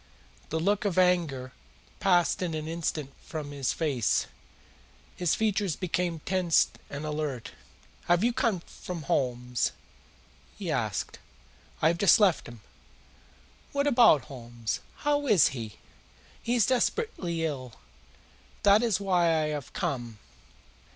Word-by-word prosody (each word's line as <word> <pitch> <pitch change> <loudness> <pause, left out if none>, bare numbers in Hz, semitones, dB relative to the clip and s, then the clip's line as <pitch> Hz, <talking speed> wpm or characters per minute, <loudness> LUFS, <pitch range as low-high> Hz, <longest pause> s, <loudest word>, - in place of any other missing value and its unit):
The 160 - -1
look 200 +5 +1
of 195 -4 -1
anger 165 -9 +2 0.5
passed 180 -4 +3
in 170 -3 -2
an 155 0 -4
instant 160 -4 -3
from 150 -3 -6
his 140 -2 -1
face. 140 -9 +1 0.9
His 175 -3 +1
features 205 -5 0
became 175 -3 -2
tense 185 -2 +2 0.2
and 145 +2 -5
alert. 150 -5 -3 0.5
"Have 175 +3 +3
you 240 +1 +2
come 230 -7 0
from 170 -1 -8
Holmes?" 125 -2 0 0.8
he - - -3
asked. - - -2 0.6
"I 160 - +6
have 170 +1 -1
just 200 +2 +6
left 195 -6 +3
him." 120 -2 -11 1.1
"What 280 0 +1
about 235 - +6
Holmes? 120 -4 -5 0.3
How 290 -1 +2
is 200 - +6
he?" 115 -8 -7 0.6
"He 235 +1 0
is 230 -5 +4
desperately 240 - 0
ill. 130 -6 -5 0.9
That 200 +2 +6
is 230 -5 +1
why 185 -3 +2
I 160 -2 +2
have 145 -3 -5
come." 120 -4 -3
165 Hz, 130 wpm, -28 LUFS, 140-195 Hz, 1.1 s, I